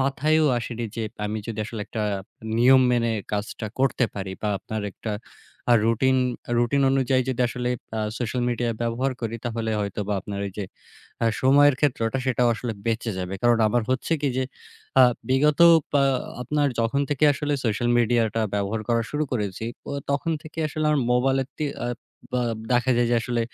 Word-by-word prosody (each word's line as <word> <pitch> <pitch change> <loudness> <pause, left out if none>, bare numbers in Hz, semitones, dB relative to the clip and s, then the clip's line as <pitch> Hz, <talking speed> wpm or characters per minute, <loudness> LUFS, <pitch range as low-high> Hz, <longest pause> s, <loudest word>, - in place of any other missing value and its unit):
মাথায়ও 150 +4 +2
আসেনি 120 0 -4
যে 115 - -2 0.2
আমি 105 +1 -3
যদি 115 -2 -5
আসলে 115 -2 -6
একটা 110 - -4 0.6
নিয়ম 130 +2 +6
মেনে 120 -1 +2 0.2
কাজটা 105 +2 -3
করতে 130 -1 +2
পারি 95 -1 -4
বা 105 - 0
আপনার 110 +2 -5
একটা 110 - -5 0.6
আ - - +8
রুটিন, 130 +3 +3 0.4
রুটিন 120 +4 +2
অনুযায়ী 130 -1 +2
যদি 125 - -3
আসলে 125 0 -3 0.5
সোশ্যাল 125 +1 -2
মিডিয়া 120 0 0
ব্যবহার 120 +3 0
করি 115 -1 -3
তাহলে 115 -1 -2
হয়তো 100 0 -3
বা 105 - +1
আপনার 100 +1 -6
ওই 100 - -7
যে 105 - -2 0.6
আ - - +3 0.2
সময়ের 145 +1 +6
ক্ষেত্রটা 130 -3 +1
সেটাও 125 -2 +2
আসলে 115 0 -4
বেঁচে 115 0 -1
যাবে। 90 +1 -4
কারণ 120 -1 +4
আমার 120 +2 +1
হচ্ছে 130 +5 0
কি 145 - +2
যে 130 - +1 0.6
আ - - +10 0.3
বিগত 145 +4 +3 0.3
পা 140 - +4 0.4
আপনার 145 +2 +1
যখন 115 +5 +1
থেকে 145 +1 +2
আসলে 145 +1 -2
সোশ্যাল 115 +1 0
মিডিয়াটা 115 -1 +2
ব্যবহার 100 +2 -1
করা 115 -1 +2
শুরু 150 +1 0
করেছি 105 -3 -2 0.5
তখন 140 +4 0
থেকে 155 +1 -12
আসলে 155 +1 -3
আমার 150 -2 +2
মোবাইলে 135 +2 +2
তি 155 - -2 0.2
আ - - -1 0.5
বা 125 - +1
আ - - -3 0.2
দেখা 125 +1 +2
যায় 120 - +3
যে - - +3
আসলে 120 -1 -1
120 Hz, 175 wpm, -24 LUFS, 115-135 Hz, 0.6 s, আ